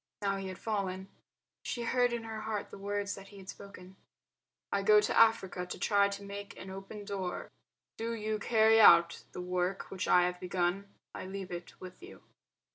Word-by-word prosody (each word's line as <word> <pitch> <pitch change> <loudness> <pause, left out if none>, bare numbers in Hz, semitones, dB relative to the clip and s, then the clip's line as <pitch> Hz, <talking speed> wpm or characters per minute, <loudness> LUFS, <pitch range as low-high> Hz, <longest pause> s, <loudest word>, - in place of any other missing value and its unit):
Now 195 -1 +1
he 195 0 -5
had 185 -1 -6
fallen. 195 -3 -3 0.5
She 240 - -4
heard 245 +1 +2
in 235 -1 -3
her 220 -1 -6
heart 215 -2 -4
the - - -9
words 205 0 -2
that 195 0 -10
he 200 - -14
had 190 0 -12
spoken: 190 -1 -11 0.7
"I 200 - +1
go 210 +2 +6
to 210 - 0
Africa 190 -5 +3
to - - -6
try 200 -1 +3
to 200 0 -6
make 200 0 -8
an 190 - -8
open 195 +2 -8
door....; 195 -3 -4 0.5
do 230 +1 -3
you 215 -1 -2
carry 220 0 +5
out 170 -4 +7
the - - -5
work 180 +1 -2
which 190 - -3
I 180 - +6
have 180 0 -1
begun. 180 +2 -1 0.2
I - - -6
LEAVE 190 -1 -6
IT 175 0 -8
WITH 185 - -11
YOU." 370 +4 -13
200 Hz, 195 wpm, -32 LUFS, 185-215 Hz, 0.7 s, out